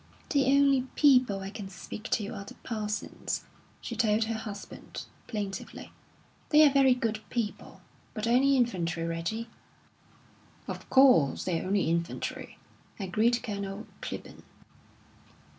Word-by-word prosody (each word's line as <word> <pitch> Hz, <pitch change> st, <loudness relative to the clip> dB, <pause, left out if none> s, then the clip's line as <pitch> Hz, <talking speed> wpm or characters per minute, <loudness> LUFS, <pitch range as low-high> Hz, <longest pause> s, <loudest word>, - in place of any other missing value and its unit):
"The 280 Hz, -2 st, +3 dB
only 275 Hz, -1 st, +4 dB
people 250 Hz, -9 st, +4 dB
I 195 Hz, +1 st, -6 dB
can 205 Hz, -2 st, -7 dB
speak 195 Hz, +4 st, -9 dB
to 205 Hz, -, 0 dB
are 200 Hz, -, -6 dB
the 200 Hz, -, -11 dB
Parsons," 210 Hz, -3 st, -3 dB, 0.4 s
she -, -, -5 dB
told 215 Hz, 0 st, +2 dB
her 225 Hz, +1 st, -2 dB
husband, 215 Hz, -2 st, -7 dB, 0.2 s
plaintively. 200 Hz, -4 st, -5 dB, 0.6 s
"They're 300 Hz, -1 st, +7 dB
very 270 Hz, -2 st, +5 dB
good 225 Hz, -3 st, -1 dB
people 230 Hz, -4 st, -4 dB, 0.3 s
but 215 Hz, -1 st, -2 dB
only 265 Hz, +4 st, +4 dB
infantry, 175 Hz, -9 st, 0 dB
Reggie." 170 Hz, +8 st, -3 dB, 1.2 s
"Of -, -, -7 dB
course, 255 Hz, -, +5 dB
they're 180 Hz, -1 st, -1 dB
only 195 Hz, 0 st, +1 dB
infantry," 170 Hz, +1 st, -3 dB, 0.4 s
agreed 220 Hz, +5 st, +1 dB
Colonel 200 Hz, -1 st, -4 dB, 0.2 s
Clibborn. -, -, -7 dB
215 Hz, 120 wpm, -29 LUFS, 195-250 Hz, 1.2 s, They're